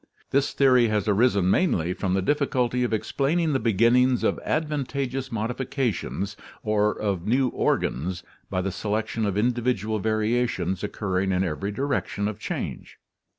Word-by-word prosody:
This 140 +1 +2
theory 125 -3 +5
has 105 -2 0
arisen 100 -3 +3
mainly 90 - +2
from 95 0 -1
the 95 - 0
difficulty 125 -2 +1
of 120 - -1
explaining 145 +8 0
the 135 - +2
beginnings 120 +3 +3
of - - +1
advantageous 135 -4 -2
modifications 115 -3 -2 0.3
or 105 -1 +2
of 100 -3 -2
new 130 +3 +3
organs 90 - -1 0.3
by 95 -1 -1
the 95 - -1
selection 110 +2 -2
of 100 -1 -1
individual 115 -2 0
variations 110 -3 0
occurring 95 -2 -1
in 90 0 +1
every 95 +4 -2
direction 120 -4 -1
of 105 -2 -5
change. - - -5
110 Hz, 140 wpm, -25 LUFS, 100-125 Hz, 0.3 s, theory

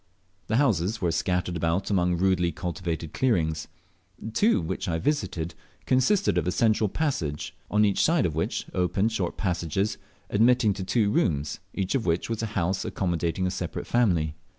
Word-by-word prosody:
The 110 - 0
houses 110 - +2
were 85 -4 +1
scattered 90 +1 0
about 85 +4 0
among 90 -2 +2
rudely 90 -1 +2
cultivated 85 -1 -4
clearings. 80 -12 0 0.7
Two 215 - +3
which 85 +3 -3
I 80 - 0
visited 85 - -1 0.3
consisted 135 +11 +3
of - - -3
a - - +2
central 110 +1 +2
passage, 90 - -2
on 105 +1 +3
each 100 -2 +2
side 160 -5 +3
of 80 - -1
which 80 +2 -2
opened 95 +4 +1
short 95 -6 -2
passages, 90 +1 -1 0.3
admitting 115 0 +3
to 95 -1 -5
two 105 +1 +1
rooms, 75 -7 0 0.2
each 95 -1 -1
of 130 -7 0
which 85 +7 0
was 115 - -2
a 115 - -1
house 95 +1 0
accommodating 85 -1 -1
a 90 - 0
separate - - -4
family. 90 -11 +2
95 Hz, 165 wpm, -26 LUFS, 85-110 Hz, 0.7 s, Two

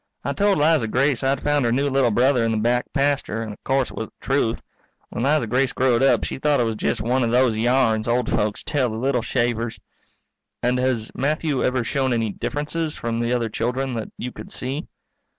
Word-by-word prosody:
I - - -1
told 205 -1 +2
Liza 150 -5 +3
Grace 135 +3 +1
I'd 135 0 0
found 145 -1 +2
her 120 - +1
new 140 +4 +1
little 135 -3 +2
brother 125 +2 +3
in 115 - +1
the 110 - 0
back 120 +3 0
pasture, 140 -6 0
and 110 -2 -6
o'course 135 +3 -1
it - - -11
was 110 - -3
the - - -26
truth. 130 -4 +1 0.5
When 120 - -3
Liza 145 -1 +2
Grace 125 +3 +1
growed 125 -2 +2
up 135 - +3
she - - -4
thought 150 0 +2
it - - +3
was 115 -1 -1
jest 105 - -1
one 125 +4 +1
of 120 - +1
those 125 -1 +3
yarns 115 -1 +2
old 120 0 +1
folks 105 -1 -1
tell 135 -5 0
the 110 - -5
little 125 +1 0
shavers. 120 -1 -1 0.8
_And 125 +1 +2
has 125 -3 0
Matthew 150 0 0
ever 125 -1 +1
shown 130 +1 0
any 115 -2 0
differences 150 +7 -3
from 115 0 -3
the 120 0 -1
other 120 -2 +1
children 125 +4 -2
that 115 -2 -4
you 125 - -5
could - - -10
see? 135 +6 -3
125 Hz, 215 wpm, -22 LUFS, 115-135 Hz, 0.8 s, Liza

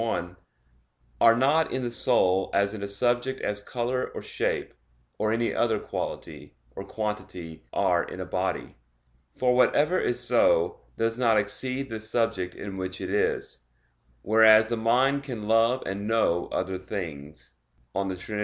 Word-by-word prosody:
1) 90 -6 -2 0.9
"are 115 0 +7
not 145 +6 +2
in 130 - -2
the 120 - -2
soul 95 -6 +2
as 100 +1 +2
in 110 - -7
a 100 - -3
subject 120 +5 0
as 105 0 -2
color 125 +3 -2
or - - -5
shape, - - -2 0.5
or 110 0 +1
any 115 +1 0
other 115 -2 +1
quality, - - -6 0.2
or 95 - -6
quantity, 95 -7 -6
are - - +2
in - - -9
a - - -4
body; - - -3 0.6
for 125 -1 +2
whatever 150 +7 +3
is 120 - 0
so, - - +2 0.2
does 115 +1 -1
not 115 -3 +3
exceed 130 +6 0
the 110 -3 -5
subject 110 -5 -1
in 100 -1 -7
which 95 0 -4
it 95 -1 -4
is: 100 -10 -1 0.6
Whereas 110 +1 +6
the 120 - 0
mind 125 +5 +2
can 120 -7 -6
love 115 +3 +3
and 100 +2 -4
know 110 -6 +1
other 95 0 -3
things" 80 -7 -7 0.4
(De 95 -1 -2
Trin. 105 +4 -5
110 Hz, 155 wpm, -26 LUFS, 95-120 Hz, 0.9 s, are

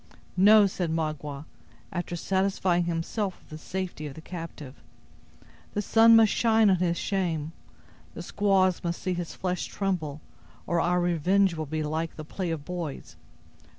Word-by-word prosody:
"No!" 210 +3 +7
said 185 -3 -2
Magua, 155 -2 -3 0.5
after 175 0 -4
satisfying 190 -1 +1
himself 175 +4 -2
of - - -25
the 155 - -6
safety 185 -4 -5
of 135 - -9
the - - -9
captive; 165 -6 -9 0.9
"the 205 - +1
sun 225 +2 +6
must 225 -2 +6
shine 220 -3 +4
on 185 - +3
his 175 -1 0
shame; 165 -6 -1 0.6
the - - -6
squaws 190 -3 +2
must 170 0 -2
see 185 - -2
his 175 -1 -5
flesh 180 -1 -2
tremble, 170 -7 -2 0.5
or 170 0 +1
our 180 +1 +2
revenge 175 +2 +2
will 155 -2 -4
be 155 +2 -2
like 160 +2 -3
the 155 - -8
play 180 +3 -4
of 155 -3 -4
boys. 175 -6 -6
175 Hz, 155 wpm, -27 LUFS, 160-190 Hz, 0.9 s, No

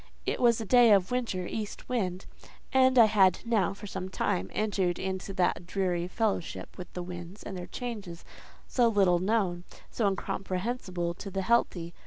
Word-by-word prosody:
It - - -1
was 235 -2 +4
a 225 - -4
day 240 +1 +6
of 195 0 +3
winter 230 -8 -1
east 210 +2 -5
wind, 190 -7 -2 0.5
and 260 -1 +5
I 235 - +9
had 195 -4 +4
now 220 -5 +2
for 205 - -10
some 190 -2 -5
time 95 - -1
entered 195 -5 0
into 190 +1 -4
that 175 -1 0
dreary 180 -3 -1
fellowship 205 -3 -2
with 180 - -9
the 180 - -4
winds 175 +2 -8
and 195 - -6
their 180 -1 -6
changes, 200 -6 -6 0.4
so 245 -2 +3
little 195 -5 +3
known, 185 -3 0 0.3
so 220 - +1
incomprehensible 185 -2 -2
to 195 +3 -8
the 195 0 -2
healthy. 180 -7 +1
190 Hz, 170 wpm, -29 LUFS, 180-225 Hz, 0.5 s, I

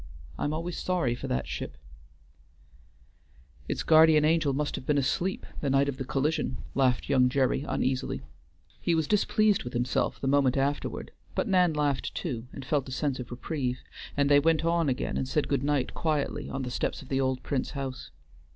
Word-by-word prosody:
I - - -3
am 145 - 0
always 165 +3 -3
sorry 175 -10 0
for 120 - -6
that 65 +1 -1
ship" - - -5 1.9
"Its - - -2
guardian 155 -1 +6
angel 160 -2 +3
must 145 +2 -1
have - - -6
been 150 - +3
asleep 170 +7 0
the 140 - -1
night 135 +1 +3
of 140 -2 -2
the - - -3
collision," 145 +5 0 0.2
laughed 130 -2 +2
young 125 -2 +4
Gerry, 130 0 +1
uneasily; 130 +1 -1 0.6
he 170 - +2
was 160 -2 +1
displeased 210 0 +3
with 125 - -7
himself 120 +1 0
the - - -4
moment 135 -1 +3
afterward, 140 +2 -1 0.2
but - - 0
Nan 180 -5 +3
laughed 145 -3 0
too, 125 -8 -4
and 135 - -8
felt 140 -2 0
a - - -7
sense 135 0 -1
of 125 - -6
reprieve; 125 0 -3 0.3
and 140 0 +3
they 145 0 +6
went 165 +2 +2
on 165 -2 +2
again 125 - -1
and 130 - -1
said 150 +2 0
good 140 -3 +1
night 140 -2 0
quietly 145 -2 -1
on 135 - -3
the 125 - -4
steps - - -2
of - - -15
the 135 0 +1
old 130 -1 -1
Prince 135 -3 -1
house. 130 -1 -5
140 Hz, 190 wpm, -28 LUFS, 130-155 Hz, 1.9 s, guardian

